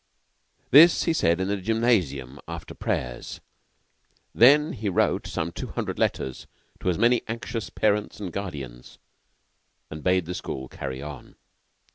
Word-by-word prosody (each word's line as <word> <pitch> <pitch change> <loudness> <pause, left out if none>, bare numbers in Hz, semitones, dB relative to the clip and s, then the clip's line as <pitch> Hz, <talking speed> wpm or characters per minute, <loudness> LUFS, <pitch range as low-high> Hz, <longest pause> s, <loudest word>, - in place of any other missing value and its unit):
This 160 +6 +8
he 165 - +1
said 85 - +2
in 95 - -1
the 100 0 0
gymnasium 90 - 0
after 85 -1 -7
prayers. - - -4 0.9
Then 150 +6 +6
he 110 -4 -3
wrote 90 - +1
some 80 +1 -3
two - - -6
hundred - - -4
letters 65 -1 -1 0.3
to - - -1
as 90 - 0
many 120 +3 +3
anxious 115 -1 -4
parents 105 -1 0
and 95 -5 -6
guardians, 70 -11 -7 0.9
and 75 0 -7
bade 90 -1 +2
the 90 - -4
school 65 -6 -5
carry 65 +1 -6
on. 75 -3 -9
95 Hz, 140 wpm, -25 LUFS, 75-115 Hz, 0.9 s, This